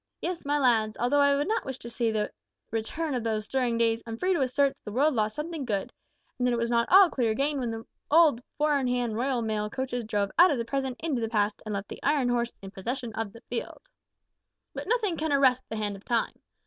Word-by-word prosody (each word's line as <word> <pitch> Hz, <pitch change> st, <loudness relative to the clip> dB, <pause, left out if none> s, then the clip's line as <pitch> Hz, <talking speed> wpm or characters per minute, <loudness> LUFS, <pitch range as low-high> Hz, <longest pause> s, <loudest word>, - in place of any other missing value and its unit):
Yes, 350 Hz, -3 st, -4 dB
my 290 Hz, +1 st, +2 dB
lads, 225 Hz, -6 st, +2 dB
although 250 Hz, +5 st, +2 dB
I 280 Hz, 0 st, +5 dB
would 290 Hz, +3 st, 0 dB
not 445 Hz, +3 st, 0 dB
wish 265 Hz, -2 st, -5 dB
to 235 Hz, -, -9 dB
see 235 Hz, -1 st, 0 dB
the 215 Hz, -1 st, -1 dB, 0.4 s
return 275 Hz, +8 st, -2 dB
of 245 Hz, -3 st, -1 dB
those 215 Hz, -2 st, -1 dB
stirring 245 Hz, -2 st, 0 dB
days, 230 Hz, 0 st, +2 dB
I'm 225 Hz, 0 st, -5 dB
free 370 Hz, +8 st, +1 dB
to 340 Hz, -, 0 dB
assert 275 Hz, +2 st, +3 dB
that -, -, -20 dB
the 210 Hz, -, -5 dB
world 285 Hz, +7 st, +3 dB
lost 215 Hz, -2 st, 0 dB
something 310 Hz, -1 st, -4 dB
good, 205 Hz, -6 st, -2 dB, 0.5 s
and 250 Hz, -, +2 dB
that 245 Hz, -, +2 dB
it -, -, +1 dB
was 235 Hz, 0 st, -1 dB
not 235 Hz, 0 st, +2 dB
all 385 Hz, +1 st, +8 dB
clear 230 Hz, -4 st, +1 dB
gain 280 Hz, +2 st, 0 dB
when 245 Hz, -2 st, -2 dB
the 225 Hz, 0 st, -5 dB, 0.2 s
old 305 Hz, -6 st, +5 dB, 0.2 s
four 300 Hz, -1 st, +2 dB
in 260 Hz, -, -1 dB
hand 245 Hz, -3 st, 0 dB
Royal 245 Hz, 0 st, 0 dB
Mail 215 Hz, -1 st, -1 dB
coaches 245 Hz, 0 st, -3 dB
drove 205 Hz, -2 st, -1 dB
out 360 Hz, +2 st, +9 dB
of 285 Hz, -, +1 dB
the 235 Hz, -, -2 dB
present 265 Hz, 0 st, -2 dB
into 300 Hz, -7 st, -1 dB
the 225 Hz, -, -1 dB
past, 210 Hz, -2 st, 0 dB
and 210 Hz, -, -2 dB
left 200 Hz, 0 st, -4 dB
the -, -, -9 dB
Iron 280 Hz, -4 st, +2 dB
Horse 240 Hz, -1 st, 0 dB
in 195 Hz, -, -8 dB
possession 235 Hz, +4 st, -4 dB
of 220 Hz, -2 st, -3 dB
the 230 Hz, -, -14 dB
field. 245 Hz, -, -7 dB, 0.8 s
"But -, -, -6 dB
nothing 425 Hz, -6 st, +1 dB
can 315 Hz, 0 st, -1 dB
arrest 260 Hz, -2 st, +3 dB
the 220 Hz, -, -4 dB
hand 205 Hz, -1 st, -2 dB
of 195 Hz, -, -13 dB
Time. 235 Hz, -2 st, 0 dB
245 Hz, 250 wpm, -28 LUFS, 225-285 Hz, 0.8 s, out